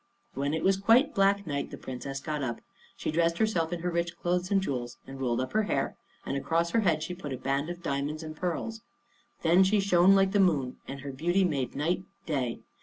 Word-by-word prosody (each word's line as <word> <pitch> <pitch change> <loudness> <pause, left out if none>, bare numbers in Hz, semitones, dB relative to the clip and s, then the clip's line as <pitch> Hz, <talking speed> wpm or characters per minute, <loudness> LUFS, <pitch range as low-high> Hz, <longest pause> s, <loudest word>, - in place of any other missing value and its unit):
When 140 +3 -1
it 160 - -2
was 190 0 +4
quite 230 +8 +4
black 200 0 +3
night 140 -3 -2
the - - -8
Princess 135 +2 -6
got 150 0 -3
up. 120 -4 -3 0.4
She - - -2
dressed 165 +1 +2
herself 180 -7 +1
in 175 -1 -3
her 180 +1 -1
rich 170 0 -1
clothes 180 +1 0
and 200 - +3
jewels, 125 -9 -3
and 135 0 -9
rolled 120 -3 0
up 130 - -3
her 215 - +3
hair, 205 - -1 0.3
and - - -2
across 165 +4 0
her 230 - +3
head 165 -7 +2
she 180 - -4
put 160 -5 -7
a - - -4
band 135 +4 -1
of 175 0 -7
diamonds 145 +2 -2
and 155 0 -7
pearls. 185 +7 -3 0.6
Then 170 +3 +6
she 200 +2 +3
shone 195 -1 +5
like 195 -1 +4
the 205 - +2
moon 150 -9 +2
and 135 0 -6
her 140 0 -5
beauty 175 +8 +1
made 140 -8 -1
night 170 +6 0 0.2
day. 130 -7 -2
165 Hz, 225 wpm, -29 LUFS, 140-190 Hz, 0.6 s, Then